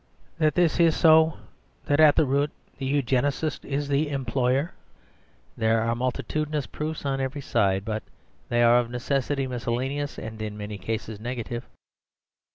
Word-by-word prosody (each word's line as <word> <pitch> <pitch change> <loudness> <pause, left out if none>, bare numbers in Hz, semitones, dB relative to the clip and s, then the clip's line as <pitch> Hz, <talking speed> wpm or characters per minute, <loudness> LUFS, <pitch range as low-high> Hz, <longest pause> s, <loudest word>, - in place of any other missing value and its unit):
That 155 -1 +2
this 175 -3 +2
is 165 -2 +5
so, 160 -1 +5 0.5
that 145 +1 +1
at 155 -2 +7
root 140 0 +2 0.3
the 135 - -2
Eugenist 140 +2 0
is 140 +1 -2
the 145 +2 +1
Employer, 135 +2 0 0.8
there 110 0 +2
are 115 +1 +1
multitudinous 145 +4 -2
proofs 155 0 -5
on 135 -1 0
every 135 +2 -3
side, 100 -6 +1
but 110 0 -2 0.5
they 120 0 +3
are 120 +1 +6
of 120 -1 -2
necessity 135 +2 -1
miscellaneous, 130 +3 -3
and 110 0 -7
in 105 -1 -4
many 105 -1 -6
cases 110 +1 -4
negative. 120 0 -4
135 Hz, 145 wpm, -26 LUFS, 115-145 Hz, 0.8 s, at